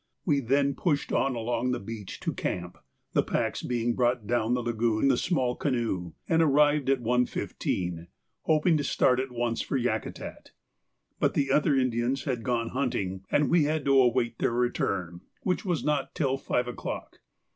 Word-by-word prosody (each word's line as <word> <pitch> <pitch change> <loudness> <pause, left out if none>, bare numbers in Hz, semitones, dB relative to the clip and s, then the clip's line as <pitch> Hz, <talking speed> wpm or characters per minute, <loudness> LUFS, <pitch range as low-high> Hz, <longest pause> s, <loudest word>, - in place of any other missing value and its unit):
We 145 -5 +3
then 140 +2 +2
pushed 145 0 -1
on 135 -2 +1
along 120 +1 -1
the - - -2
beach 105 -1 -7
to - - -2
camp, 90 0 -4 0.3
the - - +4
packs - - -1
being 120 -1 0
brought 120 -2 +1
down 120 +1 +1
the 125 - -2
lagoon 115 -1 0
in - - +5
the 130 - +4
small 130 -4 0
canoe, 115 - -2
and 165 0 +3
arrived 145 -2 +3
at 135 -3 +2
1.15, 90 -7 -1 0.3
hoping 160 +1 +3
to 145 - -1
start 130 -2 +2
at 135 +1 -2
once 120 -1 -1
for 135 - -1
Yakutat; 120 -3 -4 0.7
but - - +1
the 140 -1 +1
other 150 +1 +3
Indians 130 +1 0
had 130 -5 -2
gone 115 -1 -1
hunting, 100 -8 -2
and 145 - +3
we 170 -3 +4
had 155 0 -1
to 135 -1 +4
await 120 -1 +1
their - - +1
return, 100 -8 -1 0.2
which 185 +2 -1
was 175 -5 0
not 150 -1 -1
till 135 -6 +1
five 125 -2 -1
o'clock. 125 - -6
125 Hz, 175 wpm, -28 LUFS, 115-140 Hz, 0.7 s, in